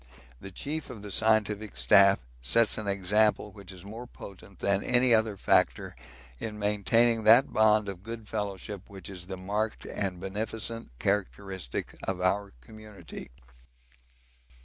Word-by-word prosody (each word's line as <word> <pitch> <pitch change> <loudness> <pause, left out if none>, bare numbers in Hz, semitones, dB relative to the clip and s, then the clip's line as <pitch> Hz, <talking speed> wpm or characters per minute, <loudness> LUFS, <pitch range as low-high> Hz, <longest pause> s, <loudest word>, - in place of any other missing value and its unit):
The 95 - -9
chief 145 - -5
of 115 -5 -9
the 105 - -7
Scientific 105 - +1
Staff 100 +11 +6 0.2
sets 110 - +2
an 105 - -5
example 105 +2 +2
which 100 -1 -12
is 95 0 -12
more 115 +4 -8
potent 100 -3 -12
than 100 0 +1
any 125 0 +3
other 110 -2 +2
factor - - +2 0.4
in 105 -1 -5
maintaining 110 +3 +2
that 115 +5 +6
bond 110 -1 +4
of 95 -3 -6
good 110 +1 -8
fellowship 100 -2 -4
which 100 0 -9
is 90 -2 -8
the 95 -1 -5
marked 105 +4 -2
and 95 -3 -3
beneficent 110 +4 -4
characteristic 95 -5 -3
of 95 -1 -3
our 100 +2 0
community. 105 - -11
105 Hz, 140 wpm, -29 LUFS, 95-110 Hz, 0.4 s, Staff